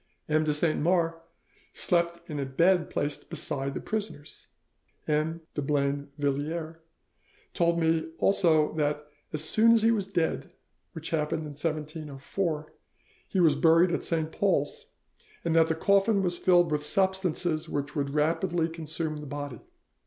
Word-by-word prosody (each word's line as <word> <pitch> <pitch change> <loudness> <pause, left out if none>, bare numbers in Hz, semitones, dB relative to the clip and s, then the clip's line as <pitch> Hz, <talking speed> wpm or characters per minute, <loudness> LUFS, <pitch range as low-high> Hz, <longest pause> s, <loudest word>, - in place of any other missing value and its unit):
M. 155 0 +2
de 155 - +1
Saint 155 +2 +1
Mars 170 0 +2 0.6
slept 170 -1 0
in 150 -4 -4
a 140 - -1
bed 170 +5 +3
placed 145 0 -3
beside 135 0 -2
the - - -2
prisoner's. 205 -9 -6 0.6
M. 155 +2 0
de 145 - -2
Blainvilliers 145 +3 -2 0.8
told 170 0 +2
me 160 0 +1
also 160 -6 +3
that 150 0 0 0.3
'as 150 0 0
soon 220 +8 +5
as 225 -2 +3
he 225 - +5
was 205 -4 0
dead, 170 -4 -1 0.4
which 160 0 -6
happened 160 0 0
in 155 - -6
1704, 155 +1 -4 0.5
he 190 - -1
was 160 -5 +5
buried 165 +4 +5
at - - -1
Saint 160 -1 -1
Paul's,' 175 -8 0 0.6
and 165 -1 +1
that 165 -1 +5
'the 160 - 0
coffin 200 +4 +3
was 175 -1 0
filled 175 -3 +4
with 150 -1 +1
substances 180 -2 0
which 145 0 -3
would 140 -2 -1
rapidly 165 +3 +1
consume 160 -1 -4
the 150 0 -8
body. 145 -4 -6
160 Hz, 145 wpm, -28 LUFS, 150-170 Hz, 0.8 s, soon